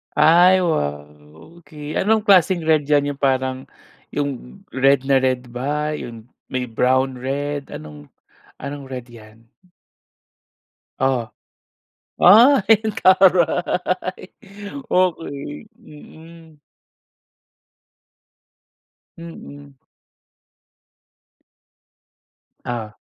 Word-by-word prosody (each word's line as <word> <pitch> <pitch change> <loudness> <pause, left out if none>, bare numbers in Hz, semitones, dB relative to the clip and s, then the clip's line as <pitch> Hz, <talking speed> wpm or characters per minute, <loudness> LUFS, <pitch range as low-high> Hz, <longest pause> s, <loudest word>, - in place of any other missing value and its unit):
Ay, 180 +3 +5
wow, 75 - -1 0.6
okey. 150 -2 -8
Anong 215 +1 +1
klaseng 185 -4 +3
red 155 -2 +1
yan, 145 -1 +2
yung 140 - -11
parang, 130 -1 -1 0.5
yung 135 - -5
red 135 +1 +2
na 135 -1 +3
red 130 -1 -2
ba, 145 +5 -3
yun 120 -5 -8 0.2
may 130 -1 -3
brown-red, 130 +4 -1
anong 75 -1 -11 0.5
anong 140 -1 -8
red 125 -2 -7
yan? 115 -1 -17 1.5
Oh? 130 -4 0 0.9
Ay, 220 +1 +6
ang 215 -1 -3
taray! 185 0 +2 0.7
Okey. 165 -1 -2
Mm. 160 -3 -16 2.6
Mm. 145 -4 -12 2.9
Oh. 115 -3 -5
145 Hz, 75 wpm, -20 LUFS, 130-170 Hz, 2.9 s, Ay